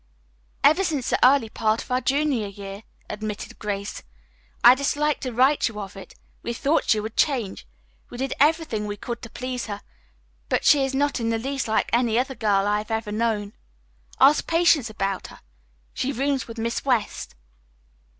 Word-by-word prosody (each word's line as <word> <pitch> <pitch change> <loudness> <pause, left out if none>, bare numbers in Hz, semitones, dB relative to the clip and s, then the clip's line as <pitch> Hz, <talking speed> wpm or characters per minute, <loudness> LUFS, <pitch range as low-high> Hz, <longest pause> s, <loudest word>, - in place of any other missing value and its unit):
"Ever 320 +6 +5
since 295 -9 -1
the - - +1
early 260 -2 +5
part 220 0 0
of - - -14
our 250 +1 +1
junior 275 -6 +1
year," 200 0 -8 0.3
admitted 210 0 -6
Grace. 200 -1 -4 0.6
"I 240 - +10
disliked 290 +2 0
to 255 - -3
write 260 +5 +3
you 220 -3 -6
of 200 -1 -7
it. 195 - -11 0.3
We 235 - -3
thought 285 +6 0
she 215 - +4
would 220 +1 -6
change. 240 - 0 0.4
We - - -9
did 265 +1 -2
everything 295 -8 +2
we 205 0 -5
could 235 +3 -6
to 230 - -9
please 250 0 -5
her, 205 -1 -5 0.7
but - - 0
she 285 -2 +6
is 270 0 -2
not 285 0 +1
in 230 -1 -1
the 225 - +1
least 270 +3 -3
like 220 - +1
any 235 -2 +2
other 265 +2 0
girl 205 -5 +1
I 205 0 +1
have 210 - -8
ever 220 -1 -2
known. 210 -2 -1 0.7
Ask 285 +3 +5
Patience 330 -7 +3
about 195 -3 -3
her. - - -15 0.5
She 265 - -2
rooms 275 +1 -1
with 230 0 -9
Miss 230 +1 -2
West." 245 - -1
235 Hz, 180 wpm, -24 LUFS, 210-275 Hz, 0.7 s, I